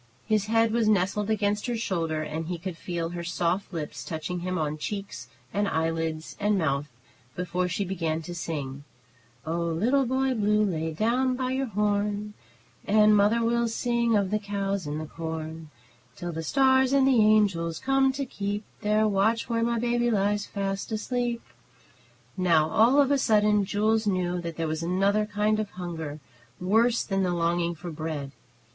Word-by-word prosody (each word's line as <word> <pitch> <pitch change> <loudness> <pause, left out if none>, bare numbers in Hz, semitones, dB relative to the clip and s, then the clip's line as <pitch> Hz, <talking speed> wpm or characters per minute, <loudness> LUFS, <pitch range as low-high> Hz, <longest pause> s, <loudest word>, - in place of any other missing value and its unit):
His 215 -1 +1
head 225 0 +3
was 230 -1 +1
nestled 205 +1 +1
against 210 0 0
her 240 -1 -1
shoulder, 165 -7 -1
and 160 +1 -4
he 175 0 -3
could 180 +1 -6
feel 170 -1 -4
her 170 0 -5
soft 175 +3 -1
lips 160 -4 -5
touching 165 +2 -4
him 185 +1 -2
on 155 -1 -2
cheeks 195 - -5 0.3
and 205 0 +1
eyelids 160 -1 -2
and 205 0 +2
mouth, 145 -4 0 0.5
before 180 0 -1
she 180 +3 -2
began 165 -4 -2
to 175 - -6
sing: 145 -5 -5 0.6
"Oh, 165 +2 -1
little 220 +12 +1
Boy 260 +1 +1
Blue, 210 -2 +2
lay 160 -4 -2
by 255 +7 0
your 265 0 -1
horn, 210 0 -1 0.5
And 210 0 +5
mother 210 +3 +3
will 235 0 +2
sing 235 0 +1
of 200 -1 0
the 215 - +1
cows 200 -3 -2
and 150 +1 -3
the 155 - -4
corn, 160 0 -6 0.5
Till 175 0 -5
the 165 0 -4
stars 265 - +3
and 270 -1 +4
the 250 -5 +5
angels 195 -7 +3
come 270 0 +2
to 275 +1 -3
keep 205 -2 -3 0.2
Their 215 +1 +2
watch, 215 +4 +1
where 230 -1 0
my 235 0 +1
baby 240 +1 +1
lies 205 -1 +1
fast 195 +1 -3
asleep." 240 +2 -2 0.9
Now 165 -4 +3
all 240 +6 +5
of 280 -1 +4
a 280 - +3
sudden 210 -4 +3
Jules 215 +2 +1
knew 180 -2 0
that 170 -1 -6
there 165 -1 -1
was 155 +1 -2
another 195 +5 +1
kind 210 +1 +1
of 215 -2 -2
hunger 165 -5 -6 0.4
worse 225 +6 +2
than 195 -1 -1
the 180 -2 0
longing 170 0 0
for 175 +2 -7
bread. 155 -3 -4
200 Hz, 170 wpm, -27 LUFS, 170-220 Hz, 0.9 s, And